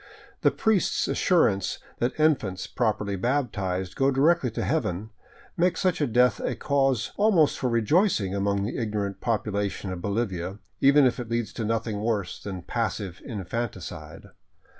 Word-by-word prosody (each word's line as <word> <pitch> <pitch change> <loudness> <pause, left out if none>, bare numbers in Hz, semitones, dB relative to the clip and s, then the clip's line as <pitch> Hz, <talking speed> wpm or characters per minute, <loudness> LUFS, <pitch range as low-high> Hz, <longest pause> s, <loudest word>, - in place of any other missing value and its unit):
The - - +5
priest's 220 -4 +1
assurance 105 - +2 0.2
that 120 +5 -1
infants, 110 -12 +1
properly 105 -4 -1
baptized, 95 -6 -1
go 135 0 +3
directly 140 +1 +3
to 110 - -3
heaven 110 - -1 0.4
makes 175 0 +1
such 185 -4 +1
a 145 - +2
death 125 +2 +3
the - - -2
cause 135 -4 +1
almost 200 -8 +3
for 130 - 0
rejoicing 115 - +2
among 100 0 0
the 110 - -3
ignorant 105 -3 -3
population 100 -4 -2
of 90 - -6
Bolivia, 100 -3 -2 0.2
even 140 +1 +6
if 125 0 +1
it 120 -2 -5
leads 115 -3 -2
to 115 - -4
nothing 110 -1 -1
worse 105 -5 -2
than 95 -4 -6
passive 100 -4 -3
infanticide. 115 +2 -6
115 Hz, 145 wpm, -26 LUFS, 100-135 Hz, 0.4 s, even